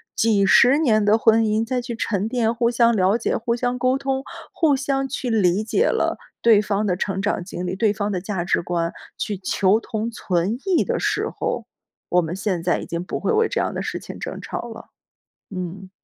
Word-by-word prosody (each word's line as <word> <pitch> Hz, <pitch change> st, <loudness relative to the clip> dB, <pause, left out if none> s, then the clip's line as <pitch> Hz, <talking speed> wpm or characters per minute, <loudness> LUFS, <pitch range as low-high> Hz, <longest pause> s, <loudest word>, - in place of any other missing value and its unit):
几 210 Hz, -3 st, +3 dB
十 250 Hz, +7 st, +6 dB
年 225 Hz, -9 st, +3 dB
的 210 Hz, +2 st, +4 dB
婚 225 Hz, 0 st, +4 dB
姻 220 Hz, +1 st, +1 dB
再 250 Hz, +1 st, -1 dB
去 240 Hz, -1 st, -5 dB
沉 210 Hz, -3 st, -1 dB
淀， 230 Hz, -1 st, 0 dB
互 235 Hz, 0 st, +1 dB
相 235 Hz, -1 st, +3 dB
了 195 Hz, +2 st, +3 dB
解、 235 Hz, -, -1 dB
互 235 Hz, +1 st, -1 dB
相 245 Hz, +1 st, -2 dB
沟 255 Hz, +1 st, +2 dB
通、 270 Hz, -1 st, -2 dB, 0.3 s
互 305 Hz, -4 st, +3 dB
相 270 Hz, 0 st, -1 dB
去 260 Hz, -1 st, -4 dB
理 200 Hz, -2 st, +2 dB
解 315 Hz, -, +1 dB
了 -, -, 0 dB, 0.3 s
对 225 Hz, -3 st, +6 dB
方 210 Hz, 0 st, -1 dB
的 185 Hz, -3 st, +1 dB
成 195 Hz, +1 st, -2 dB
长 205 Hz, -1 st, -1 dB
经 180 Hz, 0 st, -6 dB
历， 180 Hz, +1 st, -2 dB
对 210 Hz, +2 st, +2 dB
方 210 Hz, 0 st, -2 dB
的 185 Hz, -3 st, -2 dB
价 190 Hz, -2 st, -3 dB
值 180 Hz, -, +1 dB
观， 170 Hz, -1 st, -2 dB, 0.2 s
去 205 Hz, -2 st, -3 dB
求 195 Hz, +2 st, +2 dB
同 225 Hz, 0 st, -4 dB
存 190 Hz, -1 st, -1 dB
异 375 Hz, -4 st, +3 dB
的 -, -, -1 dB
时 -, -, 0 dB
候， -, -, -3 dB, 0.4 s
我 180 Hz, -, +3 dB
们 165 Hz, +1 st, -4 dB
现 190 Hz, -3 st, -2 dB
在 175 Hz, +1 st, +1 dB
已 -, -, -6 dB
经 170 Hz, +1 st, -4 dB
不 -, -, -4 dB
会 -, -, 0 dB
为 445 Hz, 0 st, +3 dB
这 -, -, -1 dB
样 -, -, -2 dB
的 -, -, -3 dB
事 -, -, -3 dB
情 -, -, -9 dB
争 -, -, -5 dB
吵 -, -, -5 dB
了， 225 Hz, 0 st, -11 dB, 0.7 s
嗯。 185 Hz, +1 st, -6 dB
215 Hz, 235 characters per minute, -22 LUFS, 190-240 Hz, 0.7 s, 十